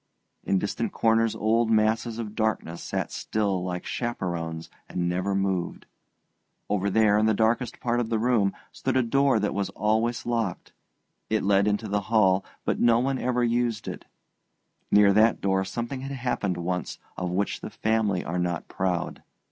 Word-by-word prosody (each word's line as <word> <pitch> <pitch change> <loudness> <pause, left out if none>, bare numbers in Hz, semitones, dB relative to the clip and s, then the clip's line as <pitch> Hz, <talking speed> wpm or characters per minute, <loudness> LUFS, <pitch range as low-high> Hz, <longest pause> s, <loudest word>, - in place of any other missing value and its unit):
In 95 - +1
distant 105 +3 -2
corners 115 0 +2
old 115 +1 +2
masses 110 +1 +2
of 110 -3 -5
darkness 110 -6 -1
sat - - -3
still 100 -4 -1
like 90 -1 -4
chaperones 85 -9 -3 0.2
and 85 -1 -1
never 95 +3 -1
moved. 95 -2 -1 0.9
Over 100 -1 +1
there, 105 0 +4
in 110 - +3
the 110 - +3
darkest 115 +2 +1
part 120 0 0
of 115 -2 -1
the 115 - +1
room, 110 -4 +2 0.2
stood - - -1
a 130 - +3
door 135 +3 +3
that - - -1
was 100 -1 -1
always 110 +3 0
locked. 115 -6 -2 0.6
It 110 0 +1
led 100 0 +3
into 105 +1 0
the 105 0 0
hall, 100 -3 +3 0.2
but - - 0
no 115 -1 +5
one 130 +2 0
ever 125 0 0
used 120 -2 0
it; - - -6 0.8
near 100 -1 +6
that 110 +2 +4
door 95 -1 +1
something 120 +6 -4
had 135 +1 -5
happened 120 -8 -1
once 90 0 -3 0.2
of 90 -1 -3
which 95 +3 -1
the - - -6
family 110 -4 0
are 85 +2 -2
not 90 -2 -2
proud. 90 -2 -2
110 Hz, 170 wpm, -26 LUFS, 95-115 Hz, 0.9 s, near